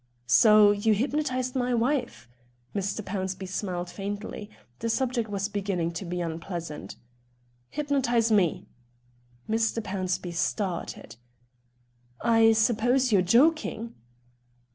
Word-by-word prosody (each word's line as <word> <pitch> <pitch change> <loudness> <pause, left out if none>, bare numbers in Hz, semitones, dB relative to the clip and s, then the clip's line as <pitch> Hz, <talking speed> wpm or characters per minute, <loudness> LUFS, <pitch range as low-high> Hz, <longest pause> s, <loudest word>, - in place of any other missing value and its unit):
"So 210 - +6
you 205 +1 +2
hypnotised 255 +1 -1
my 250 -1 +1
wife?" 245 - -1 0.5
Mr. 200 +1 -2
Pownceby 190 -1 -4
smiled 180 -2 -4
faintly; 205 +1 -6 0.3
the 230 - -2
subject 240 -2 0
was 200 -1 -2
beginning 195 -5 -2
to 175 +3 -6
be 180 +1 -3
unpleasant. 165 -1 -5 0.7
"Hypnotise 260 -6 +1
me." 190 -7 +2 0.8
Mr. 225 +1 0
Pownceby 185 -4 -3
started. 175 - -3 1.0
"I 225 -1 +5
suppose 240 +3 +2
you're 200 -3 +5
joking?" 235 - +2
210 Hz, 100 wpm, -27 LUFS, 185-235 Hz, 1.0 s, So